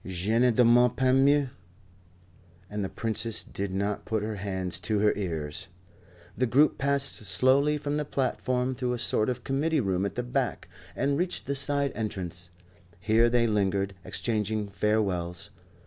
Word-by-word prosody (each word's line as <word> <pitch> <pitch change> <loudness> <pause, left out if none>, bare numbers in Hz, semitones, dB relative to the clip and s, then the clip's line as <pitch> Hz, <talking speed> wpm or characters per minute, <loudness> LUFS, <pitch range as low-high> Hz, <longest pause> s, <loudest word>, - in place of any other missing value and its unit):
Je 95 +4 -2
ne 125 +1 +4
demande 120 +1 +4
pas 130 -1 +2
mieux." 140 0 +3 1.2
And 105 -1 -3
the 95 - -3
Princess 115 0 0
did 100 -1 -5
not 100 +2 -2
put 110 -2 -2
her 110 -1 -4
hands 95 -3 -2
to 105 +3 -1
her 105 +1 +3
ears. 80 -4 -4 0.7
The 130 - 0
group 140 +6 +3
passed 140 0 +4
slowly 130 +9 +3
from 145 0 -3
the 150 - -1
platform 130 -2 -1
through 125 -1 -2
a - - -2
sort 110 -1 +1
of 125 - -4
committee 150 +4 0
room 95 -5 0
at 100 - -3
the 125 - -2
back, 125 0 -2 0.3
and 140 +3 0
reached 180 0 -1
the 140 - -2
side 140 0 0
entrance, 90 -5 -4 0.5
Here 110 +4 +3
they 120 0 +2
lingered, 100 -2 0
exchanging 105 -2 -2
farewells. 95 -4 -1
115 Hz, 160 wpm, -27 LUFS, 100-130 Hz, 1.2 s, ne